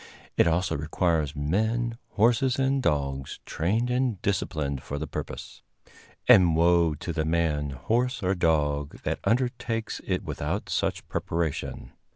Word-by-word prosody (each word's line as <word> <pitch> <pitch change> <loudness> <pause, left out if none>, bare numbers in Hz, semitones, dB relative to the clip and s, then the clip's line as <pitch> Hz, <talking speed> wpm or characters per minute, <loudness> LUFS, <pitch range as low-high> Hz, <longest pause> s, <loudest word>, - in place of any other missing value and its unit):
It - - +4
also 90 +3 +1
requires 80 0 0
men, 110 +10 0
horses 120 +4 +3
and 135 0 +2
dogs 70 - -1
trained 110 +9 0
and 125 -5 0
disciplined 75 -9 -1
for 70 - -5
the 75 - -3
purpose; - - -7 0.7
and 85 -4 +7
woe 85 -1 +4
to 85 +4 -5
the 80 - 0
man, 80 -3 0
horse 120 - -1
or 95 +1 +2
dog 75 -5 0
that - - -1
undertakes 120 -2 -1
it - - -1
without - - -3
such - - -1
preparation. 80 -3 -3
85 Hz, 135 wpm, -27 LUFS, 75-115 Hz, 0.7 s, and